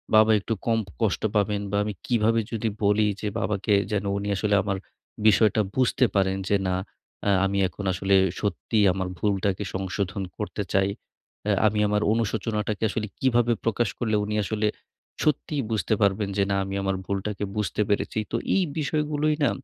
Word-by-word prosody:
বাবা 110 Hz, +1 st, +6 dB
একটু 105 Hz, +3 st, -2 dB
কম 115 Hz, -1 st, +2 dB, 0.2 s
কষ্ট 110 Hz, -4 st, +1 dB
পাবেন 105 Hz, 0 st, +1 dB
বা 100 Hz, -, +1 dB
আমি 105 Hz, 0 st, -3 dB
কিভাবে 115 Hz, -1 st, +2 dB
যদি 115 Hz, -1 st, -1 dB
বলি 105 Hz, +1 st, +3 dB
যে 105 Hz, -, -2 dB
বাবাকে 100 Hz, 0 st, 0 dB, 0.2 s
যেন 105 Hz, -1 st, 0 dB
উনি 100 Hz, +1 st, -3 dB
আসলে 105 Hz, +1 st, +1 dB
আমার 100 Hz, -1 st, -1 dB, 0.5 s
বিষয়টা 110 Hz, +1 st, +5 dB
বুঝতে 130 Hz, 0 st, +3 dB
পারেন। 95 Hz, -1 st, +2 dB
যে 100 Hz, -, +4 dB
না, 90 Hz, -, +1 dB, 0.5 s
অ্যা 100 Hz, -, +3 dB
আমি 100 Hz, +1 st, 0 dB
এখন 100 Hz, -, -8 dB
আসলে 95 Hz, +2 st, +2 dB, 0.2 s
সত্যিই 105 Hz, +1 st, +1 dB
আমার 95 Hz, -1 st, -2 dB
ভুলটাকে 100 Hz, +1 st, 0 dB
সংশোধন 95 Hz, +1 st, -2 dB
করতে 105 Hz, -1 st, -3 dB
চাই। 95 Hz, 0 st, +3 dB, 0.6 s
অ্যা 105 Hz, -1 st, +2 dB
আমি 105 Hz, 0 st, 0 dB
আমার 105 Hz, 0 st, +1 dB
অনুশোচনাটাকে 110 Hz, -1 st, -1 dB
আসলে 110 Hz, +1 st, -2 dB
কীভাবে 120 Hz, -2 st, +3 dB
প্রকাশ 115 Hz, 0 st, +1 dB
করলে 110 Hz, -3 st, 0 dB
উনি 105 Hz, +1 st, -2 dB
আসলে 105 Hz, +1 st, 0 dB, 0.6 s
সত্যিই 150 Hz, -1 st, 0 dB
বুঝতে 110 Hz, -1 st, 0 dB
পারবেন 100 Hz, 0 st, +2 dB
যে, 100 Hz, -, +4 dB
না, 100 Hz, -, +2 dB
আমি 95 Hz, 0 st, -4 dB
আমার 95 Hz, 0 st, 0 dB
ভুলটাকে 100 Hz, +1 st, -3 dB
বুঝতে 105 Hz, 0 st, -1 dB
পেরেছি। 105 Hz, +1 st, 0 dB
তো -, -, -1 dB, 0.2 s
এই 195 Hz, -, +3 dB, 0.2 s
বিষয়গুলোই 150 Hz, 0 st, 0 dB
না -, -, +4 dB
105 Hz, 170 wpm, -25 LUFS, 100-115 Hz, 0.6 s, বাবা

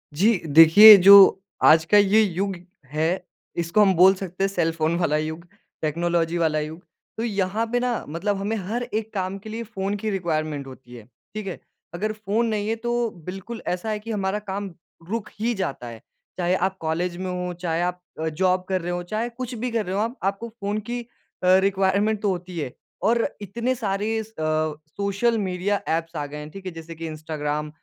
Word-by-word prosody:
जी, 210 Hz, +6 st, +3 dB
देखिए 165 Hz, +8 st, +10 dB
जो 195 Hz, 0 st, +8 dB, 0.2 s
आज 160 Hz, +1 st, +7 dB
का 205 Hz, +5 st, +4 dB
ये 205 Hz, +2 st, +5 dB
युग 195 Hz, -1 st, -1 dB, 0.4 s
है, 160 Hz, +5 st, 0 dB, 0.3 s
इसको 170 Hz, +5 st, +1 dB
हम 195 Hz, -2 st, +5 dB
बोल 185 Hz, +3 st, +7 dB
सकते 185 Hz, -1 st, -5 dB
हैं -, -, +3 dB
सेलफ़ोन 165 Hz, -3 st, 0 dB
वाला 150 Hz, -4 st, +1 dB
युग, 160 Hz, +2 st, -4 dB, 0.4 s
टेक्नोलॉजी 170 Hz, +2 st, 0 dB
वाला 160 Hz, -2 st, +1 dB
युग। 155 Hz, +3 st, -6 dB, 0.4 s
तो 225 Hz, -, -2 dB
यहाँ 205 Hz, 0 st, -1 dB
पे 245 Hz, -, +2 dB
ना 245 Hz, -1 st, -1 dB
मतलब 195 Hz, +6 st, -2 dB
हमें 205 Hz, +3 st, -2 dB
हर 235 Hz, +4 st, -2 dB
एक 220 Hz, -2 st, -4 dB
काम 190 Hz, -1 st, -2 dB
के 215 Hz, -, -10 dB
लिए 225 Hz, +2 st, -5 dB
फ़ोन 205 Hz, -3 st, -3 dB
की 215 Hz, +2 st, -3 dB
रिक्वायरमेंट 155 Hz, -7 st, -2 dB
होती 130 Hz, -2 st, -12 dB
है, 115 Hz, -, -11 dB, 0.3 s
ठीक 215 Hz, -1 st, -5 dB
है? 185 Hz, -, -5 dB, 0.3 s
अगर 210 Hz, +5 st, -2 dB
फ़ोन 215 Hz, +2 st, -1 dB
नहीं 210 Hz, -2 st, -1 dB
है 225 Hz, -, +1 dB
तो 240 Hz, +1 st, -1 dB, 0.2 s
बिल्कुल 195 Hz, +5 st, -7 dB
ऐसा 180 Hz, +5 st, -2 dB
है 215 Hz, -1 st, -2 dB
कि 225 Hz, +2 st, -7 dB
हमारा 200 Hz, -1 st, -1 dB
काम 200 Hz, -2 st, -5 dB, 0.4 s
रुक 220 Hz, 0 st, -3 dB
ही 235 Hz, +3 st, 0 dB
जाता 155 Hz, -10 st, -4 dB
है, 115 Hz, -1 st, -9 dB, 0.4 s
चाहे 180 Hz, 0 st, +1 dB
आप 190 Hz, +1 st, -1 dB
कॉलेज 170 Hz, +2 st, -2 dB
में 185 Hz, 0 st, -4 dB
हो, 180 Hz, 0 st, -3 dB
चाहे 170 Hz, -1 st, -2 dB
आप 180 Hz, 0 st, -2 dB, 0.2 s
अ, 160 Hz, -, -1 dB
जॉब 185 Hz, +3 st, +1 dB
कर 185 Hz, -1 st, 0 dB
रहे 175 Hz, +1 st, -3 dB
हो, 175 Hz, 0 st, -2 dB
चाहे 215 Hz, +6 st, -3 dB
कुछ 250 Hz, +1 st, -6 dB
भी 240 Hz, +2 st, -3 dB
कर 225 Hz, -2 st, -1 dB
रहे 185 Hz, +1 st, -3 dB
हों 205 Hz, -, +1 dB
आप 235 Hz, +4 st, -4 dB
आपको 200 Hz, +4 st, -2 dB
फ़ोन 210 Hz, -2 st, -4 dB
की 245 Hz, 0 st, -2 dB, 0.4 s
अ, 185 Hz, +1 st, +6 dB
रिक्वायरमेंट 200 Hz, +2 st, +1 dB
तो 205 Hz, -, +1 dB
होती 180 Hz, -1 st, -4 dB
है। 130 Hz, -5 st, -4 dB, 0.4 s
और 230 Hz, 0 st, +2 dB
इतने 235 Hz, +6 st, -2 dB
सारे 215 Hz, 0 st, -1 dB
स 215 Hz, -, -16 dB
अ, 155 Hz, 0 st, 0 dB, 0.2 s
सोशल 200 Hz, +4 st, +1 dB
मीड़िया 195 Hz, 0 st, -1 dB
एप्स 165 Hz, +1 st, -2 dB
आ 150 Hz, -2 st, -2 dB
गए 145 Hz, +1 st, -8 dB
हैं, 150 Hz, 0 st, -8 dB
ठीक 195 Hz, +2 st, -11 dB
है, 185 Hz, -, -4 dB
जैसे 165 Hz, 0 st, -9 dB
कि 165 Hz, +1 st, -7 dB
इंस्टाग्राम 150 Hz, -1 st, -4 dB
190 Hz, 205 wpm, -24 LUFS, 165-215 Hz, 0.4 s, देखिए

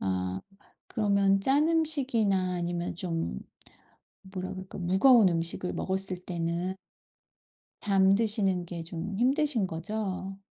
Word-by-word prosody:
아 95 Hz, 0 st, -2 dB, 0.5 s
그러면 200 Hz, -2 st, +2 dB
짠 280 Hz, +8 st, +3 dB
음식이나 250 Hz, -, +1 dB
아니면 175 Hz, 0 st, -3 dB
좀 165 Hz, -, -3 dB, 0.8 s
뭐라 185 Hz, -1 st, -6 dB
그럴까? 190 Hz, 0 st, -8 dB
무거운 190 Hz, +5 st, +5 dB
음식을 170 Hz, +1 st, -2 dB
먹었을 190 Hz, -1 st, -2 dB
때는 170 Hz, +1 st, -2 dB, 1.1 s
잠드시는 195 Hz, -1 st, +2 dB
게 170 Hz, -1 st, -6 dB
좀 175 Hz, +4 st, -5 dB
힘드신 260 Hz, -3 st, +2 dB
거죠? 190 Hz, +2 st, -4 dB
190 Hz, 230 characters per minute, -29 LUFS, 175-210 Hz, 1.1 s, 무거운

